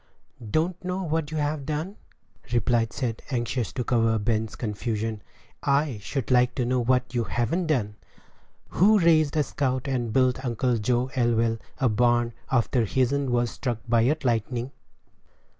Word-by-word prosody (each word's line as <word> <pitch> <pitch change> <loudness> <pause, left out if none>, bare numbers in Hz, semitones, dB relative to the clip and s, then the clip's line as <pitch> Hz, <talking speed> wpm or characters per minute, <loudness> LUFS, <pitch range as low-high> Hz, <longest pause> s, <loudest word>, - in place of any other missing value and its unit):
"Don't 170 - 0
know 185 +1 -2
what 160 -2 -1
you've 150 -2 -2
done?" 155 +6 -3 0.6
replied 120 -1 +1
Seth, 120 -4 -2
anxious 120 -3 -1
to 125 - -2
cover 115 -2 +2
Ben's 110 0 -1
confusion; 110 0 -3 0.4
"I 140 -4 +1
should 130 +4 -3
like 125 0 +3
to 125 - 0
know 125 +1 +1
what 125 +1 +1
you 120 -2 0
haven't 165 +10 -1
done. 110 -9 0 0.7
Who 210 +5 +4
raised 160 -4 +3
a 150 - +4
scout, 130 -1 -2
and 125 -4 -1
built 130 +2 +2
Uncle 120 -1 0
Joe 125 +4 0
Elwell 115 -2 +1 0.2
a 130 - +2
barn, 120 +1 +2 0.2
after 125 -1 +2
his'n 130 +4 +1
was 120 -1 +1
struck 120 -4 -3
by 120 +2 +3
lightning?" 120 +1 -1
125 Hz, 145 wpm, -26 LUFS, 115-140 Hz, 0.7 s, Who